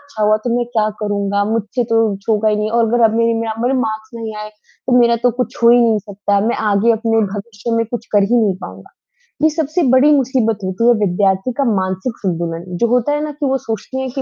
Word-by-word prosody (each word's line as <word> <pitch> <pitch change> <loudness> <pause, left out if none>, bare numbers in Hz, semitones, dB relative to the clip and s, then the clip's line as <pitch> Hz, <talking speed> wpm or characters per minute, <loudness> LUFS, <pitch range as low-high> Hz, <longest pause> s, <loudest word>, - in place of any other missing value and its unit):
अच्छा 285 -7 -7
हुआ 210 0 +4
तो 245 - -1
मैं 245 - 0
क्या 215 -1 +2
करूँगा? 200 -1 -1
मुझसे 225 +2 -1
तो 230 0 -1
कुछ 195 +1 -8
होगा 215 0 +2
ही 210 - +1
नहीं 210 +1 -2
और 230 -1 +3
अगर 240 +1 +1
अब 220 0 +3
मेरे 230 0 +2
म - - -1 0.2
मेरे 250 +2 +1
मार्क्स 220 0 -4
नहीं 225 -1 -6
आए, 210 0 -6
तो 245 +4 -3
मेरा 235 -1 +4
तो 245 - +5
कुछ 245 0 -3
हो 235 - +7
ही 240 - +6
नहीं 225 -2 +3
सकता, 205 0 -2
मैं 225 +3 0
आगे 205 +4 +3
अपने 225 0 +1
भविष्य 210 +2 -6
में 230 - +1
कुछ 230 0 -6
कर 205 -1 +4
ही 245 - +4
नहीं 200 -3 +1
पाऊँगा। 95 +1 -11 0.5
ये 315 - +6
सबसे 315 +2 -1
बड़ी 270 +3 +5
मुसीबत 255 -5 +1
होती 190 +5 -1
है 240 - +6
विद्यार्थी 190 +4 0
का 280 - +2
मानसिक 190 +5 -3
संतुलन, 170 -2 -2
जो 235 - +2
होता 245 +4 +1
है 295 +1 -1
ना 305 - -4
कि 295 0 -4
वो 270 0 +1
सोचते 230 +2 -6
है 265 0 -3
कि 270 - -1
225 Hz, 245 wpm, -17 LUFS, 205-245 Hz, 0.5 s, हो